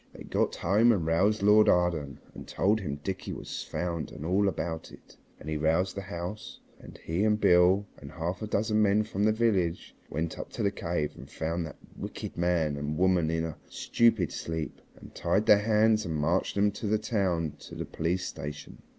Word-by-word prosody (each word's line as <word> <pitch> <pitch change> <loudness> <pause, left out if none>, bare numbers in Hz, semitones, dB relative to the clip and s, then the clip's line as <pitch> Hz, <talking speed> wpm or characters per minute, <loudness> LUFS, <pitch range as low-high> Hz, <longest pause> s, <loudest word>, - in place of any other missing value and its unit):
They - - -10
got - - 0
home 105 +7 +4
and 95 -8 +1
roused 100 +6 +2
Lord 105 +1 +6
Arden, 85 -6 +1
and - - -10
told 105 +3 +1
him 75 -8 -3
Dickie 95 -1 -4
was - - -6
found 85 0 -3
and 75 0 -8
all 95 +4 +2
about 80 -3 -3
it, - - -16 0.2
and - - -11
he 80 0 -1
roused 80 +5 +1
the 100 - -3
house, 95 +1 -6 0.2
and - - -12
he 85 +5 -2
and 105 -1 +2
Beale 90 +2 +5
and 70 -1 -11
half 85 +1 -3
a 110 - -3
dozen 110 +1 +1
men 105 +1 +3
from 105 -1 -1
the 110 - +4
village 100 -7 0
went 80 +3 -3
up - - -6
to - - -3
the 100 - +2
cave 85 -6 -2
and 65 - -12
found 80 +2 -3
that - - -11 0.2
wicked - - -6
man 85 -4 +1
and 75 +1 -3
woman 90 -3 +3
in 80 0 0
a 80 - -6
stupid 115 -7 +2
sleep, 80 -4 -5 0.2
and - - -13
tied 105 +3 0
their 105 - +7
hands 110 0 +3
and 85 -5 -3
marched 80 +5 0
them 105 +1 +3
to 105 - -5
the 110 +1 +2
town 100 -6 0
and 75 - -5
to - - -11
the - - -4
police 90 +3 -2
station. 75 +1 -7
90 Hz, 205 wpm, -29 LUFS, 80-105 Hz, 0.2 s, their